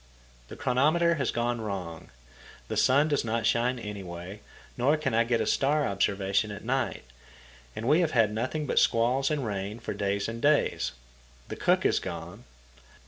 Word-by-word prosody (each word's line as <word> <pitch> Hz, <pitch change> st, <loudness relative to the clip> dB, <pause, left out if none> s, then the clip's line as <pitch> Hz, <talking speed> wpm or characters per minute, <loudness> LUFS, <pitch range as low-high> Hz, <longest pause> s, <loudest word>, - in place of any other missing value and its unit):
The -, -, -9 dB
chronometer 155 Hz, +7 st, +2 dB
has 130 Hz, -, 0 dB
gone 120 Hz, 0 st, -1 dB
wrong. 90 Hz, -6 st, -6 dB, 0.6 s
The -, -, -2 dB
sun 140 Hz, +4 st, +4 dB
does 145 Hz, -2 st, 0 dB
not 115 Hz, -1 st, -1 dB
shine 120 Hz, +4 st, +2 dB
anyway, 95 Hz, -3 st, -7 dB, 0.4 s
nor 140 Hz, +5 st, +2 dB
can 145 Hz, -5 st, -2 dB
I 115 Hz, +1 st, +4 dB
get 115 Hz, -1 st, 0 dB
a -, -, 0 dB
star 145 Hz, +6 st, +2 dB
observation 100 Hz, +1 st, 0 dB
at 100 Hz, +1 st, -8 dB
night, 130 Hz, +2 st, -1 dB, 0.7 s
and 115 Hz, -, -4 dB
we 150 Hz, +5 st, +5 dB
have 170 Hz, -3 st, +2 dB
had 110 Hz, -4 st, +3 dB
nothing 130 Hz, +7 st, -2 dB
but -, -, +2 dB
squalls 125 Hz, +4 st, +2 dB
and 150 Hz, -4 st, -1 dB
rain 100 Hz, +1 st, -4 dB
for 120 Hz, -, -5 dB
days 100 Hz, 0 st, -1 dB
and 115 Hz, +1 st, -6 dB
days. 145 Hz, 0 st, +2 dB, 0.6 s
The -, -, -4 dB
cook -, -, +1 dB
is -, -, +3 dB
gone. -, -, -7 dB
115 Hz, 170 wpm, -28 LUFS, 105-135 Hz, 0.7 s, we